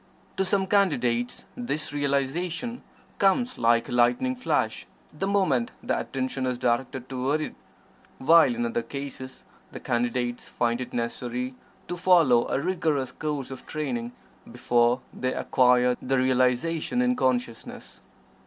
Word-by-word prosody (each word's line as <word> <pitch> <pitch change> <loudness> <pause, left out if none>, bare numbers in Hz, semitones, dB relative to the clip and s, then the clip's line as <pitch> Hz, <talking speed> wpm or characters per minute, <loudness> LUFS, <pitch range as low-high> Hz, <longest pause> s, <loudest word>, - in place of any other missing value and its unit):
To 190 - +1
some 190 0 +2
Candidates, 125 - +1
this 155 - -3
realization 155 - -1 0.4
comes 240 +6 +2
like 115 0 +3
a - - -8
lightning 120 - +2
flash 255 - -1 0.3
the 195 - -3
moment 180 -13 +2
the - - 0
attention 130 0 -3
is 125 -1 -1
directed 125 +1 -1
toward 135 +3 -1
it, 155 - -4 0.6
while 165 - +5
in 240 0 -1
other 235 0 -1
cases 140 - -7 0.3
the - - -7
Candidates 120 0 -2
find 120 +1 0
it 125 0 -6
necessary 120 +2 -3 0.3
to 175 - -3
follow 170 -10 +4
a - - 0
rigorous 150 -5 0
course 150 -4 -4
of 130 - -9
training 125 -6 -3 0.4
before 120 +1 +2
they 130 0 -2
acquire 125 -1 +3
the 135 +1 0
realization 130 - +1
in 250 0 +2
consciousness. 120 - -2
130 Hz, 135 wpm, -26 LUFS, 125-170 Hz, 0.6 s, while